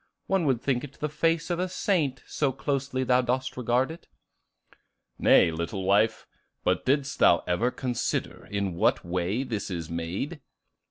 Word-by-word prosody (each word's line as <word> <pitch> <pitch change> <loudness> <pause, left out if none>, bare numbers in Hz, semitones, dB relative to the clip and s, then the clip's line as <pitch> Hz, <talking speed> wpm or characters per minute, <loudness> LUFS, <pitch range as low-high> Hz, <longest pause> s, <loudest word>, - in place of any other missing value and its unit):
One 190 -5 +1
would 125 -4 +1
think 125 -3 0
it 140 -2 -8
the 150 - -1
face 165 +3 0
of 175 - -1
a 185 +1 -1
saint, 160 -8 0
so 140 -3 0
closely 135 0 -2
thou 125 0 +4
dost 125 +1 -1
regard 125 +3 +1
it." 165 +1 -11 1.1
"Nay, 85 - +5
little 85 +4 -3
wife; 100 +4 +2 0.4
but - - 0
didst 140 +1 +1
thou 85 - +5
ever 90 +8 +1
consider 125 -1 -3
in 100 -2 -2
what 85 - +1
way 90 +7 -1
this 110 -7 -4
is 85 -3 -5
made?" 90 - -4
125 Hz, 160 wpm, -27 LUFS, 100-145 Hz, 1.1 s, Nay